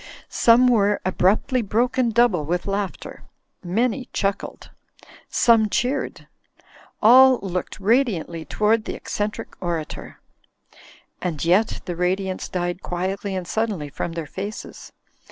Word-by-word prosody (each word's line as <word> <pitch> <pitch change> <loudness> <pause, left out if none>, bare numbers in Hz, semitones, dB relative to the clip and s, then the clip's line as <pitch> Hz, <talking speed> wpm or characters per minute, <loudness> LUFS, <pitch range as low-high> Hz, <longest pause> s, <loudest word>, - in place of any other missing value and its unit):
Some 235 +2 +5
were 210 -4 +3
abruptly 205 +8 +2
broken 240 +4 +1
double 230 -8 +3
with 175 +4 -2
laughter. 200 -1 -4 0.4
Many 235 +7 -1
chuckled. 200 0 -3 0.6
Some 225 -3 +4
cheered. 250 +6 -2 0.8
All 260 +3 +8
looked 180 -2 -4
radiantly 195 - +1
toward 215 +7 +1
the - - -4
eccentric 210 0 -4
orator. 170 -4 -5 1.0
And 170 -4 -3
yet 190 +6 +2
the 175 - -4
radiance 185 +2 -1
died 175 0 -3
quietly 190 +2 -3
and 185 -2 -4
suddenly 205 -10 -2
from 165 +4 -4
their 165 -2 -4
faces. 200 +8 -7
200 Hz, 115 wpm, -22 LUFS, 180-230 Hz, 1.0 s, All